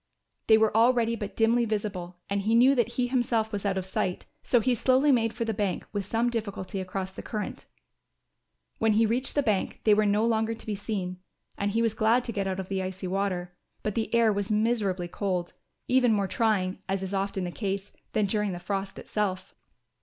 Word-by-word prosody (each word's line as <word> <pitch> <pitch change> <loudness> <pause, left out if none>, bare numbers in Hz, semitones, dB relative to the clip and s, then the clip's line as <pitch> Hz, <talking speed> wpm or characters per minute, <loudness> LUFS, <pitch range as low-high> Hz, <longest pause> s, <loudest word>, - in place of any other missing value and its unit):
They 220 - +7
were 220 -1 +2
already 230 0 +4
but 205 -3 -6
dimly 230 +2 +4
visible 200 -5 -3
and 200 0 -1
he 220 +3 +2
knew 255 +4 +6
that 240 -2 +1
he 250 - +1
himself 240 -3 0
was 205 -1 -2
out 195 -1 0
of 190 - -2
sight, 185 -1 -2 0.2
so 245 - +3
he 250 +2 +2
slowly 260 +4 +3
made 225 -3 +3
for 230 0 -3
the 225 - -1
bank 200 -3 -2
with 200 -2 -3
some 230 +3 +1
difficulty 200 -4 -4
across 190 0 -4
the - - -8
current. 215 -2 -5 1.1
When 220 -1 +3
he 225 +2 +4
reached 245 +4 0
the 290 - +3
bank 210 -6 -1
they 215 - +5
were 210 0 +3
no 210 +2 +2
longer 225 0 +1
to - - -12
be 215 - -2
seen, 195 -3 -4 0.4
and 200 - -1
he 225 +3 +1
was 225 -2 +1
glad 225 +3 +3
to 240 - -4
get 200 -3 -2
out 190 0 -2
of 190 - -4
the 195 -1 -2
icy 185 0 -5
water. 185 -2 -2 0.3
But 210 - -1
the 225 +1 -2
air 230 -2 +4
was 205 +1 -2
miserably 210 -5 +1
cold, 180 -1 -2 0.3
even 250 -2 +4
more 200 -2 +1
trying, 195 -5 0
as 195 0 -1
is 190 +1 -4
often 195 -1 -1
the 175 - -3
case, 195 0 -3 0.2
than 215 -1 +2
during 210 -1 0
the 175 - -5
frost 195 +2 -3
itself. 190 -3 -3
210 Hz, 215 wpm, -27 LUFS, 195-230 Hz, 1.1 s, They